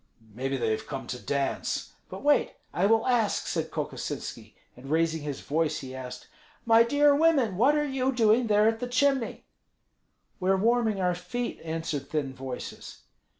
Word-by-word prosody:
"Maybe 135 +4 -2
they 115 - 0
have 110 - -3
come 135 -2 -5
to 125 - -5
dance." 140 -1 -2 0.2
"But - - -8
wait; 290 0 +3 0.2
I 185 +3 +2
will 225 +1 +3
ask," 240 -5 +1
said - - -2
Kokosinski. - - -5 0.2
And 130 +2 -11
raising 160 0 +1
his 145 -2 -5
voice, 155 +1 -1
he 130 -1 -8
asked, 130 -1 -8 0.4
"My 230 0 +6
dear 285 +5 +4
women, 285 - +3
what 260 +9 +4
are 295 0 +1
you 265 -2 0
doing 230 -1 +3
there 210 0 +4
at 225 0 +1
the 245 - -3
chimney?" 265 -1 +1 0.9
"We 185 0 -1
are 195 - +4
warming 225 0 +2
our 180 -1 +2
feet," 180 +8 -4
answered 160 -3 -4
thin 145 -4 -2
voices. 130 -1 -8
200 Hz, 170 wpm, -28 LUFS, 145-245 Hz, 0.9 s, My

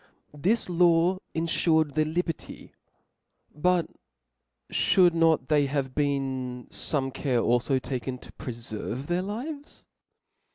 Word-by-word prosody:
This 190 +11 0
law 175 +1 +3 0.2
infured 160 -2 +2
their 155 +1 +2
liberty; 165 0 -4 0.8
but 175 +3 +2 0.9
fhould 180 -3 +4
not 165 -5 +3
there 145 -2 +3
have 135 -2 -2
been 130 -4 -1
fome 135 -3 -2
care 135 -2 0
alfo 120 +4 +2
taken 130 0 -4
to - - -14
preferve 120 +1 -6
their 175 +3 0
lives 270 +10 -6
150 Hz, 110 wpm, -27 LUFS, 130-175 Hz, 0.9 s, fhould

